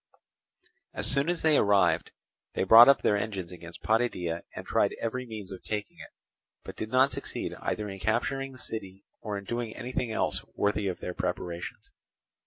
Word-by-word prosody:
As - - 0
soon 140 +4 +2
as 175 -1 -1
they 155 -2 +5
arrived, 100 -1 +3 0.5
they - - +1
brought 115 +6 +10
up 140 - +5
their 105 - +3
engines 100 -4 -3
against 85 -1 -11
Potidæa 90 -7 0
and - - -6
tried - - +1
every 125 +2 -3
means 105 -4 -7
of 95 - -8
taking 105 -2 -4
it, - - -10 0.5
but - - -8
did 110 - -5
not 130 +3 +4
succeed - - -3
either 105 - -2
in 95 -1 -7
capturing 135 +7 -1
the 130 - -13
city 100 -5 -6 0.2
or 105 -2 -3
in 100 - -7
doing 120 +2 -4
anything 125 -1 -3
else - - 0
worthy 105 0 +1
of 90 - -3
their 90 - -4
preparations. 90 -1 -4
105 Hz, 180 wpm, -29 LUFS, 95-120 Hz, 0.5 s, brought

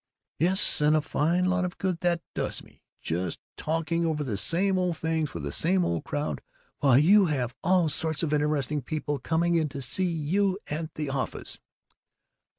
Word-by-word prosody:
"Yes, 185 0 +3
and 150 +1 +4
a - - +4
fine 165 +4 +1
lot 185 0 +1
of 180 0 -4
good 185 -3 -1
that 175 -1 +1
does - - -3
me! - - -21 0.2
Just 85 +1 -2 0.2
talking 165 +1 -1
over 155 -2 0
the 120 -7 -3
same 185 - +1
old 180 -3 0
things 160 -2 -1
with 85 - -4
the 70 - -3
same 180 - +2
old 85 -2 -2
crowd, 145 +1 -3 0.4
while 135 -4 +5
you 190 +7 +6
have 130 -6 -1
all 180 -1 +3
sorts 160 +2 -1
of 155 -2 0
interesting 150 -1 +1
people 145 +1 -3
coming 170 +5 +1
in 160 -3 +2
to 140 0 -6
see 160 +9 0
you 185 +5 +1
at 155 +1 -3
the 150 -3 -3
office." 135 -1 -4
160 Hz, 180 wpm, -27 LUFS, 145-175 Hz, 0.4 s, you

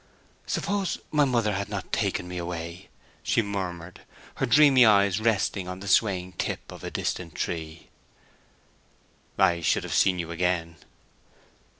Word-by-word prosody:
"Suppose 200 -2 -1
my 150 -1 +4
mother 115 -5 +1
had 100 +1 -3
not 100 -2 -5
taken 90 - -1
me 90 0 -5
away?" 85 +1 -6 0.3
she 85 +9 +1
murmured, 90 -4 -5 0.4
her - - 0
dreamy 140 -1 +6
eyes 100 -3 +4
resting 105 -4 0
on 90 0 -6
the 100 - -8
swaying 95 -2 +2
tip - - -3
of - - -11
a - - -4
distant 85 -3 -4
tree. 80 -1 -5 1.5
"I 85 -1 +3
should 80 - +1
have - - -5
seen 95 -1 +3
you 85 -1 -4
again." 85 -1 -1
90 Hz, 140 wpm, -26 LUFS, 85-105 Hz, 1.5 s, dreamy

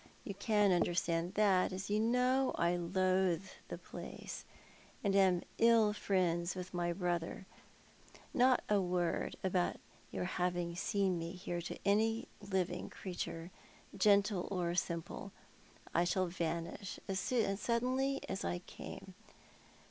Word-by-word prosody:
You 200 - -5
can 205 0 +3
understand 175 0 +1
that, 195 -4 +4
as 190 +2 -4
you 210 - +3
know 250 +4 +2
I 170 +1 +2
loathe 185 0 +1 0.2
the - - -5
place, - - -8 0.6
and 200 -2 +2
am 185 -3 +4 0.2
ill 225 -2 +5
friends 180 -4 +1
with 185 0 -6
my 175 -1 0
brother. 175 0 -2 0.9
Not 255 0 +4
a 205 -1 +3
word 180 -2 0
aboiit 185 -2 +1 0.3
your - - -3
having 175 -1 -1
seen 190 -1 +1
me 165 +1 -4
here 175 -1 -4
to 175 - -5
any 225 +3 +2
living 190 -3 -1
creature, 175 -2 -5 0.4
gentle 200 -1 +3
or 180 -3 0
simj^le. 175 +2 -3 0.6
I 170 - +4
shall 185 +1 +1
vanish 170 +1 -3
as 190 -1 -1 0.4
suddenly 255 +4 +1
as 190 - -3
i 85 0 -1
came. - - -9
185 Hz, 125 wpm, -35 LUFS, 175-205 Hz, 0.9 s, ill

